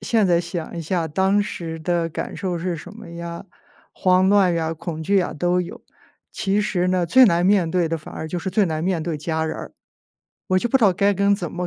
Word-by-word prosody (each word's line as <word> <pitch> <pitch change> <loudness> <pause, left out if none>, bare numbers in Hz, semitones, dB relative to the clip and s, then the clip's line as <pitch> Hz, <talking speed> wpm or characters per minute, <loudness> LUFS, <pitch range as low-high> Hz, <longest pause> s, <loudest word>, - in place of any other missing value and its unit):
现 220 -4 +2
在 170 -2 +3
想 170 -1 -6
一 - - -3
下 165 0 -1
当 190 +6 +2
时 165 -5 -6
的 170 0 0
感 160 - -5
受 185 -3 -2
是 175 0 -2
什 160 - -10
么 225 - -11
呀， 170 +1 -7 0.5
慌 185 0 +3
乱 195 -3 +4
呀、 165 -1 -1
恐 160 0 -6
惧 200 +5 +1
呀 185 -2 +1
都 175 +3 +1
有。 175 - -7 0.5
其 200 +1 0
实 180 -4 0
呢， 180 -1 +1
最 260 +10 +6
难 175 -5 +3
面 190 -3 +3
对 175 -1 +1
的 165 0 -2
反 155 - -11
而 160 - -5
就 175 - -3
是 190 - -4
最 205 +2 +2
难 160 -2 -2
面 180 -3 0
对 160 -1 -3
家 160 +1 -2
人 160 - -3
儿， - - -8 0.8
我 185 - +3
就 240 - -1
不 265 - +3
知 260 - -1
道 195 - +5
该 200 +3 +2
跟 200 +1 +3
怎 175 -5 -5
么 180 0 -3
175 Hz, 255 characters per minute, -22 LUFS, 165-195 Hz, 0.8 s, 最